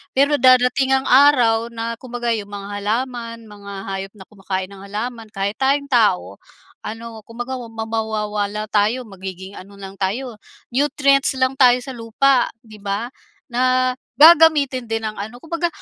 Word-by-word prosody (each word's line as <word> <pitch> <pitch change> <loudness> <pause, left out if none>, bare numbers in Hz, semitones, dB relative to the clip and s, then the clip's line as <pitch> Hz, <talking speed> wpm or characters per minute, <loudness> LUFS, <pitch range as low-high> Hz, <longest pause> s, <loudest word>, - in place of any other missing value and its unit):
Pero, 285 +2 +3
darating 255 +1 +4
ang 265 - 0
araw 250 -5 +4
na 230 0 -5
kumbaga 245 -2 -3
'yong 215 -3 -2
mga 205 0 -7
halaman, 230 +2 -3
mga 205 -2 -12 0.2
hayop 195 0 -5
na 195 - -12
kumakain 190 -2 -4
ng 200 - -12
halaman, 225 +3 -5
kahit 200 +2 -3
tayong 280 +1 +1
tao, 100 - +2 0.4
ano, 225 +1 -8
kumbaga 245 +3 -5
wa 240 - -8
mawawala 215 -2 -3
tayo, 215 +5 +1
magiging 190 -3 -9
ano 200 +2 -14
lang 195 0 -11
tayo, 220 +4 -3 0.3
nutrients 275 +1 +2
lang 260 +1 0
tayo 250 -2 +7
sa 265 - -7
lupa, 245 +2 +2 0.2
'di 215 -2 -14
ba? 205 +4 -3 0.4
Na, 255 +1 +2 0.2
gagamitin 295 -5 +6
din 225 0 -2
ng 215 -1 -5
ano, 220 +4 -6
kumbaga 335 +1 -1
230 Hz, 150 wpm, -20 LUFS, 205-255 Hz, 0.4 s, tayo